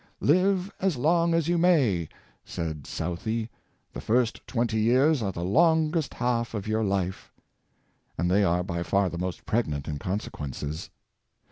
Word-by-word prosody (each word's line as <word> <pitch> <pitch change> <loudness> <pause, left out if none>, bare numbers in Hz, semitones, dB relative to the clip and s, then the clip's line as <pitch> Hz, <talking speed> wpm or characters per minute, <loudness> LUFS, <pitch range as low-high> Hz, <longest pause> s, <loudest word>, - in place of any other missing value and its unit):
*' - - -50
Live 190 +2 +1
as 190 -7 +1
long 165 +5 +2
as 165 -2 +1
you 175 0 +2
may,'' 130 - +3 0.3
said 80 -4 -5
Southey, 110 +7 -3 0.4
"the - - -6
first 115 0 +1
twenty 115 -2 0
years 130 +6 +3
are 100 -3 -1
the 85 -1 -5
longest 160 - +2
half 120 -2 -1
of 105 0 -4
your 110 +1 0
life," 95 -2 -2 0.9
and 90 - 0
they 100 +2 +4
are 90 -1 +2
by 85 -2 -3
far 95 +2 +1
the 85 - -5
most 90 0 -4
pregnant 75 -12 -1
in 75 -2 -3
consequences. 75 - -4
110 Hz, 155 wpm, -27 LUFS, -, 0.9 s, they